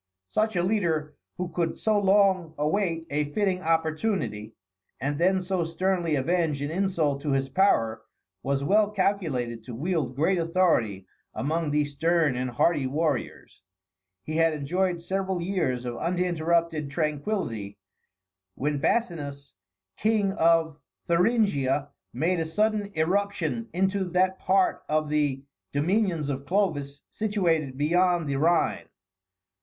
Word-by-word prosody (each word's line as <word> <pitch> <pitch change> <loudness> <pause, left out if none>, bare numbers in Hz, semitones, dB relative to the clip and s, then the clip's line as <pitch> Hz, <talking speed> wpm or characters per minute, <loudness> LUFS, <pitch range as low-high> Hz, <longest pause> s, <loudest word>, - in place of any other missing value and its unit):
Such 215 - 0
a 175 - +1
leader, 165 -7 0 0.2
who 180 -1 -3
could 170 -1 -2
so 215 -1 +2
long 190 -4 +3
await 165 +2 0
a 145 0 -1
fitting 190 -2 0
opportunity, 160 - -1 0.4
and 145 +2 -2
then 190 +2 +3
so 180 -1 0
sternly 170 0 0
avenge 160 +1 0
an 145 - -3
insult 165 -6 0
to 145 -1 -1
his 135 0 0
power, 115 - +2 0.4
was 140 +3 -1
well 205 +7 +3
calculated 160 - -1
to 115 +1 -8
wield 150 -3 -2
great 170 +6 +2
authority 165 - +1 0.3
among 160 +3 -1
these 145 0 0
stern 160 -1 +2
and 125 +1 -2
hardy 135 +3 +1
warriors. 145 -6 -3 0.6
He 155 +1 -3
had 165 -1 +3
enjoyed 175 +5 -1
several 190 +1 -2
years 165 -9 -1
of 120 -1 -4
uninterrupted 170 -3 0
tranquillity, 145 - -2 0.8
when 145 +1 -1
Basinus, 145 -7 -2 0.4
King 215 -2 +2
of 165 -4 +2 0.3
Thuringia, 170 - +2 0.2
made 165 +7 0
a 165 - -1
sudden 210 +4 +1
irruption 200 +7 -1
into 190 +1 0
that 185 +1 +1
part 190 0 +2
of 155 0 +1
the 145 -3 0 0.3
dominions 170 +1 +1
of 140 -1 -4
Clovis 150 -7 -1
situated 170 -11 0
beyond 175 +2 +2
the 140 -1 -1
Rhine. 155 - +1
165 Hz, 130 wpm, -26 LUFS, 145-185 Hz, 0.8 s, long